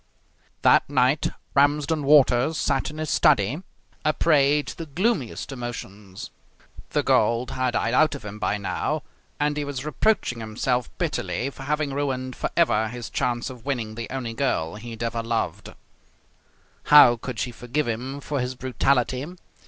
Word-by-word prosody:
That - - +5
night 140 +1 +2 0.2
Ramsden 145 +2 +2
Walters 140 0 +4
sat - - 0
in 150 - -10
his 155 -1 -3
study, 110 - +3 0.4
a 155 - +2
prey 150 -2 +3
to - - -8
the 165 - -7
gloomiest 160 - -1
emotions. 105 -6 -7 0.6
The - - 0
gold 120 +2 +2
had 130 -1 -1
died 115 - 0
out 155 +3 +4
of 135 - -9
him 105 +1 -7
by 105 - 0
now, 100 - -2 0.4
and 150 0 +1
he 150 - -1
was 140 -1 -5
reproaching 155 - 0
himself 120 +3 -1
bitterly 135 +3 -2
for 135 - -13
having 150 -1 -1
ruined 130 -2 -2
for - - -2
ever 110 -10 +3
his 120 0 -7
chance 120 +1 -1
of 125 -3 -12
winning 120 -6 -3
the 115 +1 -6
only 125 -3 -4
girl 115 -10 -1
he 110 +3 -9
had 115 0 -6
ever 115 0 -2
loved. 115 0 -3 1.1
How 145 -5 +8
could 120 +1 -7
she 125 +3 -2
forgive 125 +5 -2
him 130 +5 -4
for 145 0 -3
his 125 +1 -3
brutality? 130 +1 0
130 Hz, 160 wpm, -24 LUFS, 115-145 Hz, 1.1 s, How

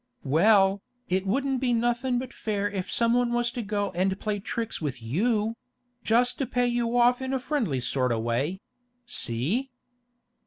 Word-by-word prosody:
'Well, 195 +6 +4 0.3
it 190 +2 0
wouldn't 265 +4 0
be 250 -2 +2
nothing 240 +2 +1
but 255 +1 -5
fair 205 -2 -1
if 195 -3 -4
someone 240 +1 +2
was 240 0 +1
to 240 - -4
go 205 -2 -2
and 190 +2 0
play 210 -1 -2
tricks 225 +1 -4
with 140 -5 -3
you—just 230 - -1
to 275 - +1
pay 245 0 +1
you 240 0 0
off 245 +1 +4
in 260 0 -2
a 265 - +1
friendly 245 - -1
sort 125 0 0
o' 115 - +1
way—see? 190 - -3
225 Hz, 155 wpm, -27 LUFS, 190-245 Hz, 0.3 s, Well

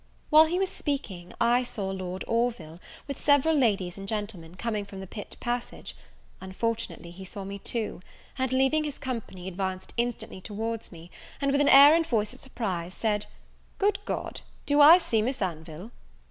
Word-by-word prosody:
While 310 +1 +9
he 340 +3 -1
was 385 0 +1
speaking, 200 - -4
I 240 +1 +4
saw 200 -5 -4
Lord 185 -1 -5
Orville, 230 -9 -1 0.3
with 280 -2 -6
several 290 +2 +4
ladies 200 -9 +1
and 195 - -7
gentlemen, 205 -6 -5
coming 215 0 -2
from 200 -1 -10
the 190 - -6
pit 205 +2 -8
passage: 240 0 -4 0.5
unfortunately 190 -2 -3
he 185 +2 -10
saw 195 +1 -7
me 200 +1 -6
too, 220 -2 -3 0.3
and, 260 -1 -1
leaving 265 +4 +3
his 295 -2 -4
company, 225 -8 -5
advanced 190 0 -4
instantly 235 -5 -2
towards 225 +3 -4
me, 170 0 -12 0.3
and 275 -1 +1
with 280 +1 +3
an 285 - +4
air 280 +2 +10
and 330 0 +2
voice 215 -3 0
of 255 - -11
surprise, 185 -9 -4
said, 210 -2 -1 0.5
"Good 405 0 +2
God, - - -4 0.2
do 290 0 +4
I 315 +4 +10
see 230 -11 +1
Miss 250 +5 -1
Anville!" 170 +2 -5
225 Hz, 175 wpm, -27 LUFS, 190-265 Hz, 0.5 s, air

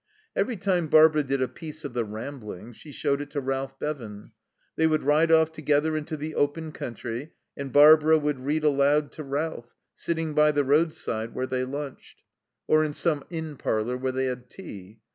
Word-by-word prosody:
Every 245 -4 0
time 180 -3 0
Barbara 155 0 +6
did 135 -1 -1
a - - 0
piece 155 +1 -9
of 140 - -5
the 120 -1 0
Ramblings 110 -1 -8
she 150 - -12
showed 140 0 -1
it 145 - -7
to 145 - -1
Ralph 135 0 -3
Bevan. 115 -9 -6 0.4
They 160 - +3
would 155 -1 +1
ride 155 +4 +3
off 160 -1 +5
together 155 0 +1
into 155 +1 -4
the 155 +2 -5
open 155 +2 -1
country, 120 +3 -6 0.2
and 140 -1 -6
Barbara 155 +2 +7
would 150 -3 -1
read 150 +4 -1
aloud 145 0 +3
to 155 - -8
Ralph, 140 -3 -4 0.2
sitting 165 -2 -3
by 150 0 +4
the 145 0 +2
roadside 135 -6 0
where 130 - -1
they 130 0 -2
lunched, 140 +1 -8 0.4
or 155 0 +4
in 150 -1 -2
some 150 -3 0
inn 160 -3 -5
parlour 110 +2 -1
where 130 +1 -2
they 130 +1 -1
had 125 -1 -4
tea. 105 - -11
145 Hz, 185 wpm, -26 LUFS, 130-155 Hz, 0.4 s, Barbara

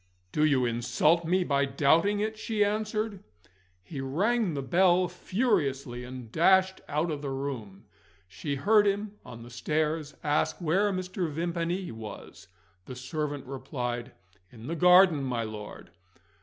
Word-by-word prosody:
"Do 150 - +1
you 140 -5 +3
insult 150 +8 +2
me 180 +3 +2
by 140 -4 +1
doubting 160 +9 +2
it?" 220 +1 -1
she 215 -1 0
answered. 215 -1 -2 0.6
He 140 - -6
rang 190 - 0
the 140 - -3
bell 180 +4 +3
furiously, 145 - -1
and 125 -3 -9
dashed 190 +5 +3
out 155 +3 0
of 145 -2 -4
the 145 - -4
room. 130 -8 -5 0.4
She 140 - -4
heard 205 +8 +4
him, 205 +1 -2
on 120 -2 -10
the 120 - -12
stairs, 150 +4 -1
ask 150 -1 +1
where 190 +5 +2
Mr. 185 -2 -3
Vimpany 170 +3 -2
was. 110 -1 -10 0.4
The 130 - -7
servant 145 +2 -4
replied: 125 -2 -4 0.4
"In 115 -2 -12
the 165 +5 -3
garden, 180 -2 +6
my 125 -3 -1
lord." 105 -1 -8
155 Hz, 140 wpm, -28 LUFS, 130-185 Hz, 0.6 s, garden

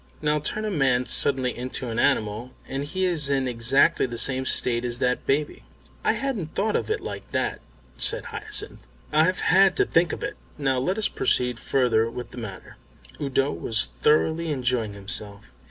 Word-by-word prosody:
Now 150 0 +1
turn 215 +8 -3
a 215 - -1
man 130 -7 +2
suddenly 130 -3 +1
into 125 0 -4
an 115 - -2
animal 110 +4 0
and 135 +1 -3
he 185 +5 -1
is 160 -6 +1
in 135 -2 +1
exactly 125 +3 +3
the 120 -1 -6
same 130 +2 +4
state 120 -1 +1
as 120 -1 -2
that 125 0 -1
baby." 145 +2 0 0.4
"I - - +3
hadn't 225 - -3
thought 210 +2 0
of - - -1
it 435 - -1
like - - -7
that," - - -1 0.4
said - - +2
Hyacinth. 425 0 -5 0.3
"I've 165 +4 +3
had 190 +2 +4
to - - +4
think 165 0 +2
of - - -5
it! - - -4 0.2
Now 135 -3 +1
let 185 +10 -1
us 220 - +1
proceed 125 -2 0
further 115 -4 +2
with 125 +1 -7
the - - -12
matter." 100 -5 -9 0.4
Udo 135 0 +1
was 105 +7 -1
thoroughly 160 +2 +2
enjoying 125 -6 0
himself. 100 -5 -6
135 Hz, 180 wpm, -25 LUFS, 120-160 Hz, 0.4 s, same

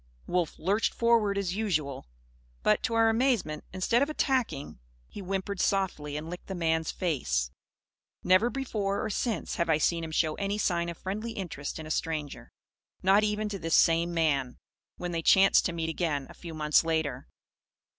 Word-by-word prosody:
Wolf 175 -3 -1
lurched 200 +6 0
forward, 230 -4 +3
as 190 -2 -1
usual. 155 - -2 0.6
But, - - +3
to 230 - -1
our 225 0 +5
amazement, 225 - +1
instead 190 +7 +1
of 285 - +2
attacking, 255 - -1 0.3
he - - -10
whimpered 195 0 -3
softly 160 -7 0
and 155 +1 -6
licked 175 +1 -8
the 190 - -4
man's 160 -2 0
face. 65 - -1 0.7
Never 185 +6 +4
before 220 -7 -2
or 220 - -2
since, 215 -3 -2
have 170 -1 0
I 160 - +4
seen 165 +2 +1
him 160 - -5
show 160 0 +1
any 200 +3 -2
sign 170 -4 0
of 170 - -6
friendly 215 +5 -4
interest 160 -8 -5
in 160 - -7
a 155 - -6
stranger 155 -3 -3 0.5
not 195 +3 +5
even 210 0 0
to 200 -2 -5
this 165 -1 +1
same 165 +1 +4
man, 145 -7 0 0.4
when 175 0 -4
they 165 -1 -1
chanced 195 +4 +5
to - - +1
meet 165 -1 -3
again, 155 -4 -1
a - - -12
few 165 -2 -9
months 150 0 +3
later. 160 -5 -1
175 Hz, 175 wpm, -29 LUFS, 160-205 Hz, 0.7 s, our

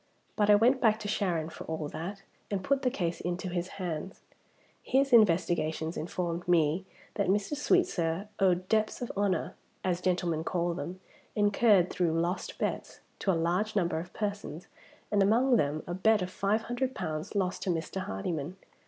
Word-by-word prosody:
But 210 -1 +2
I 210 - +9
went 245 +5 +4
back 220 -2 +4
to 210 - -4
Sharon, 175 -6 0
for - - -9
all 160 -2 -3
that, 195 +6 -6 0.3
and 195 -2 -2
put 275 +4 +1
the 255 - +2
case 175 -9 -2
into 180 +1 -3
his 175 0 -2
hands. 180 0 -4 0.6
His 270 0 +1
investigations 165 -6 +3
informed 175 +1 -3
me 170 +1 +2 0.3
that - - 0
Mr. 205 +9 +1
Sweetsir 205 - +1
owed 185 -1 +2
'debts 215 +3 +1
of 240 - -4
honor' 195 -4 0 0.3
(as 180 -1 0
gentlemen 175 -3 0
call 175 0 0
them), 180 +1 -6 0.4
incurred 205 -2 +4
through 165 -2 +1
lost 175 +3 -2
bets, - - -3 0.2
to 195 - +1
a 170 - +1
large 180 +6 0
number 170 -5 +1
of 175 +2 -8
persons, 200 -6 -4 0.5
and 205 -1 +3
among 240 +6 +4
them 150 -4 0
a 175 - -4
bet 210 +2 +3
of 185 - -5
five 210 +4 0
hundred 255 +2 -2
pounds 155 +5 -4
lost 190 -2 0
to - - -2
Mr. 170 +2 -2
Hardyman. 150 - -4
185 Hz, 170 wpm, -30 LUFS, 170-210 Hz, 0.6 s, I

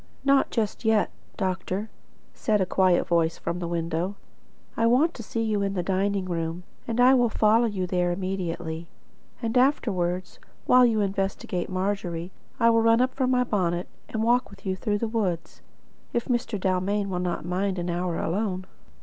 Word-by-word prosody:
"Not 275 0 +4
just 220 0 -2
yet, 220 -2 +2 0.3
doctor," 190 +2 -2 0.4
said 215 -2 +1
a 190 - +2
quiet 185 -1 +3
voice 170 -1 +2
from 170 +1 -3
the 175 - -3
window. 170 +3 -2 0.6
"I 230 - +2
want 285 +8 +4
to - - -8
see 225 +1 -3
you 215 -2 0
in 200 0 -1
the 180 - -1
dining 195 +1 0
room, 170 0 -3 0.2
and 230 -1 -2
will 245 -1 +5
follow 220 +2 +3
you 195 -4 -2
there 180 -1 0
immediately. 175 -3 -3 0.6
And 225 +1 -1
afterwards, 185 -9 +1 0.3
while 250 0 +6
you 220 -2 +1
investigate 195 -2 -2
Margery, 185 -2 -2 0.3
I 230 0 +5
will 230 0 +4
run 230 +1 +4
up 255 +1 +2
for 260 -2 0
my 250 -1 +3
bonnet, 180 -6 -1 0.2
and 220 0 -2
walk 245 +2 +2
with 200 - -16
you 190 -1 0
through 205 +2 -1
the 230 - -1
woods, 185 -7 -2 0.5
if 235 - 0
Mr. 240 -4 -1
Dalmain 190 +2 0
will 180 -2 -2
not 180 -2 -2
mind 190 +2 -1
an 175 0 -2
hour 175 0 -1
alone." 185 +1 -1
195 Hz, 175 wpm, -26 LUFS, 180-225 Hz, 0.6 s, while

